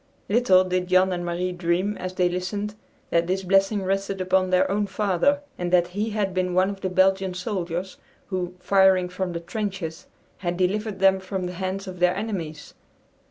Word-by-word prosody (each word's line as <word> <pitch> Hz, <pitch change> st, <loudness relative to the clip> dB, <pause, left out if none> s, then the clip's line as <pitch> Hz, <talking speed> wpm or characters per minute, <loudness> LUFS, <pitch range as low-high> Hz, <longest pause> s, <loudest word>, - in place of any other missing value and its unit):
Little 200 Hz, -4 st, +5 dB
did 180 Hz, -1 st, -1 dB
Jan 185 Hz, +1 st, +4 dB
and 175 Hz, 0 st, -3 dB
Marie 175 Hz, +1 st, -2 dB
dream 180 Hz, +3 st, 0 dB
as 185 Hz, 0 st, -5 dB
they 180 Hz, -1 st, +3 dB
listened, 190 Hz, +4 st, -3 dB, 0.4 s
that 170 Hz, 0 st, +2 dB
this 190 Hz, +1 st, -1 dB
blessing 195 Hz, +2 st, +2 dB
rested 195 Hz, +1 st, -1 dB
upon 185 Hz, 0 st, +2 dB
their 185 Hz, +1 st, +3 dB
own 205 Hz, +1 st, 0 dB
father, 210 Hz, +9 st, +1 dB, 0.2 s
and 175 Hz, 0 st, -2 dB
that 175 Hz, -1 st, +4 dB
he 205 Hz, +5 st, -2 dB
had 205 Hz, -3 st, -1 dB
been 180 Hz, -1 st, -1 dB
one 185 Hz, +2 st, +3 dB
of 195 Hz, -1 st, -9 dB
the 185 Hz, -, -1 dB
Belgian 190 Hz, 0 st, +2 dB
soldiers, 180 Hz, -1 st, -3 dB, 0.3 s
who, 180 Hz, -2 st, -3 dB
firing 190 Hz, -1 st, +4 dB
from 180 Hz, 0 st, -3 dB
the 170 Hz, -, -3 dB
trenches, 185 Hz, -3 st, -5 dB, 0.3 s
had 175 Hz, -2 st, -3 dB
delivered 200 Hz, +3 st, 0 dB
them 190 Hz, 0 st, +4 dB
from 190 Hz, -1 st, -4 dB
the 180 Hz, -, -4 dB
hands 190 Hz, +2 st, -3 dB
of 185 Hz, -2 st, -8 dB
their 180 Hz, +1 st, +3 dB
enemies. 190 Hz, -7 st, -5 dB
185 Hz, 185 wpm, -24 LUFS, 180-195 Hz, 0.4 s, Little